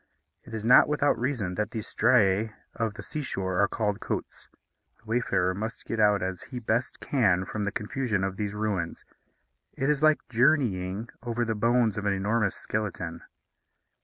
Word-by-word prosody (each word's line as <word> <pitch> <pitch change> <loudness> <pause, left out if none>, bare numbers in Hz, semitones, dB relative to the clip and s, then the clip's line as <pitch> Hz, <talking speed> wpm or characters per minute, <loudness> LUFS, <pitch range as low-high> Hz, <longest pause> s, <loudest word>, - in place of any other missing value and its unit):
It 115 - -8
is 110 -1 -4
not 125 - +7
without 145 -1 +2
reason 120 -8 -1
that 105 +3 -1
these 110 -3 -5
striæ 110 -3 +3 0.2
of 110 -2 -2
the - - -8
sea 155 - -4
shore 95 -8 -1
are 100 - +4
called 105 -1 -1
côtes. - - -5 0.5
The - - -30
wayfarer 110 -5 +1
must 110 +5 -5
get 115 - -3
out 105 -3 +4
as 95 -2 -3
he 125 - -6
best 115 +1 -1
can 95 -9 +2
from 105 +1 -3
the 105 - -1
confusion 105 -1 -2
of 95 0 -1
these 105 0 -3
ruins. 100 -6 -2 0.7
It 135 +3 +1
is 150 -1 -1
like 155 0 +3
journeying 115 -6 +1
over 120 0 -1
the 110 - 0
bones 115 -1 +2
of 105 - -3
an 100 - +3
enormous 100 +1 0
skeleton. 90 -6 -4
110 Hz, 175 wpm, -27 LUFS, 100-120 Hz, 0.7 s, not